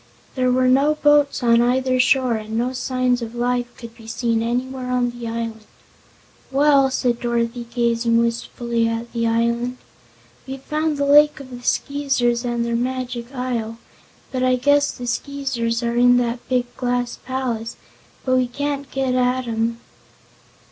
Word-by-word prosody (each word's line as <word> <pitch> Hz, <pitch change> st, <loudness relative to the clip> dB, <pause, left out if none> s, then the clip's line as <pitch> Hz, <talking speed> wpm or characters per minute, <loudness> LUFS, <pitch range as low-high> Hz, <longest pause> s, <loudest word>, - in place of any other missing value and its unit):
There 255 Hz, -1 st, +1 dB
were 255 Hz, 0 st, +3 dB
no 275 Hz, +4 st, +4 dB
boats 295 Hz, -3 st, +3 dB
on 235 Hz, 0 st, +5 dB
either 255 Hz, +1 st, +1 dB
shore 255 Hz, -1 st, +3 dB
and 220 Hz, 0 st, -4 dB
no 245 Hz, +2 st, 0 dB
signs 255 Hz, -1 st, 0 dB
of 230 Hz, 0 st, -6 dB
life 245 Hz, 0 st, 0 dB
could 235 Hz, -1 st, -10 dB
be 225 Hz, -2 st, -14 dB
seen 230 Hz, 0 st, 0 dB
anywhere 250 Hz, +2 st, -2 dB
on 250 Hz, -1 st, +1 dB
the 240 Hz, -1 st, -7 dB
island. 225 Hz, -1 st, -5 dB, 0.8 s
"Well," 275 Hz, -1 st, +4 dB
said 245 Hz, -2 st, 0 dB
Dorothy, 235 Hz, 0 st, -2 dB
gazing 235 Hz, -1 st, +1 dB
wistfully 235 Hz, 0 st, -1 dB
at 230 Hz, +1 st, -4 dB
the 230 Hz, -1 st, 0 dB
island, 235 Hz, +2 st, 0 dB, 0.7 s
"we've 265 Hz, 0 st, -7 dB
found 305 Hz, 0 st, -1 dB
the 285 Hz, -, 0 dB
Lake 295 Hz, +1 st, +5 dB
of 265 Hz, -2 st, -11 dB
the 245 Hz, 0 st, -8 dB
Skeezers 265 Hz, -3 st, 0 dB
and 240 Hz, -1 st, -1 dB
their 235 Hz, 0 st, -1 dB
Magic 245 Hz, -1 st, -3 dB
Isle. 235 Hz, -3 st, -3 dB, 0.6 s
I 255 Hz, 0 st, +2 dB
guess 285 Hz, +3 st, +3 dB
the 245 Hz, -, -8 dB
Skeezers 240 Hz, -2 st, -2 dB
are 235 Hz, 0 st, -1 dB
in 245 Hz, 0 st, +5 dB
that 240 Hz, 0 st, -2 dB
big 245 Hz, -1 st, -1 dB
glass 245 Hz, -1 st, -2 dB
palace, 245 Hz, -3 st, -3 dB, 0.5 s
but 255 Hz, -1 st, +3 dB
we 255 Hz, -1 st, +2 dB
can't 280 Hz, +2 st, -3 dB
get 265 Hz, -1 st, -1 dB
at 250 Hz, 0 st, +1 dB
'em." 230 Hz, +1 st, -1 dB
245 Hz, 155 wpm, -21 LUFS, 235-260 Hz, 0.8 s, on